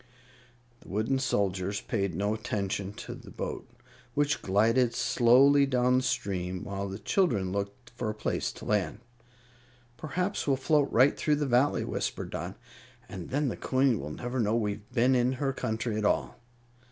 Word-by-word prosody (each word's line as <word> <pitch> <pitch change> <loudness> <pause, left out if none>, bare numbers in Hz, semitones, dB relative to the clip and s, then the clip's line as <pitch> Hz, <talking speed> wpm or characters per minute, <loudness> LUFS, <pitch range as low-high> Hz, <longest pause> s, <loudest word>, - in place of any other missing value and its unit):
The - - -18
wooden 110 +7 0
soldiers 100 -5 0
paid 100 -6 -2
no 100 +3 0
attention 100 -2 -3
to - - -7
the - - -12
boat, - - -5 0.5
which 145 0 +1
glided 115 +5 +2
slowly 130 +4 +5
down 125 -1 +3
the 130 - +1
stream, 95 -7 -2
while 100 0 -4
the 95 - -5
children 110 - +1
looked 100 +5 -5
for 120 -2 -3
a 105 - -3
place - - -2
to - - -11
land. 105 +1 0 1.0
"Perhaps 180 +5 -2
we'll 135 -2 +3
float 145 +1 +2
right 130 +4 +5
through 150 - +1
the 145 0 -1
Valley," 130 +2 +2
whispered - - -3
Dot, 90 +3 -5 0.5
"and 95 -5 -8
then 145 +1 0
the - - -3
Queen 130 -3 +2
will 75 - -5
never 125 +10 -4
know 110 -1 +2
we've 105 -2 -2
been 125 +1 +3
in 125 0 +2
her 135 +1 -1
country 110 -1 -2
at 105 - -1
all." - - +1
115 Hz, 165 wpm, -29 LUFS, 100-130 Hz, 1.0 s, slowly